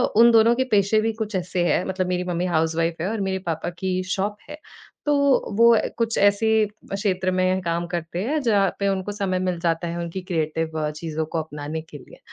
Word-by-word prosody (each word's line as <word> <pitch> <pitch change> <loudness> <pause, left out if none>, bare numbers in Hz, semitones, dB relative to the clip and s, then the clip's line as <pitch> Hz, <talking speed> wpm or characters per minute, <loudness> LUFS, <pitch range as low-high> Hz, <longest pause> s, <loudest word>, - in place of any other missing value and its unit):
उन 235 +1 +7
दोनों 225 +1 +6
के 260 - +1
पेशे 205 +1 +3
भी 225 0 0
कुछ 215 -2 -4
ऐसे 180 0 -1
हैं, - - +2
मतलब 185 -1 -2
मेरी 180 0 -1
मम्मी 180 0 -2
हाउसवाइफ़ 165 0 0
है 185 - -1
और 220 -2 -2
मेरे 190 -1 -1
पापा 160 0 -2
की 185 -1 -1
शॉप 205 +2 -2
है। 300 - -7 0.5
तो 295 0 +3 0.4
वो 235 +1 +7
अ, - - +1
कुछ 230 -1 0
ऐसे 215 +2 +3 0.3
क्षेत्र 185 -2 0
में 185 0 +1
काम 170 0 -2
करते 175 +1 -4
हैं, 300 +7 0
जहाँ 205 -6 +3
पे 200 - +1
उनको 195 +1 -2
समय 195 -3 -1
मिल 180 -2 -1
जाता 170 0 0
है 170 - -4
उनकी 170 +2 -4
क्रिएटिव 160 -2 -2
अ, 150 -1 -1
चीज़ों 155 0 -4
को 160 +1 -3
अपनाने 150 +1 -6
के 155 -2 -12
लिए। 135 - -16
185 Hz, 215 wpm, -23 LUFS, 170-205 Hz, 0.5 s, उन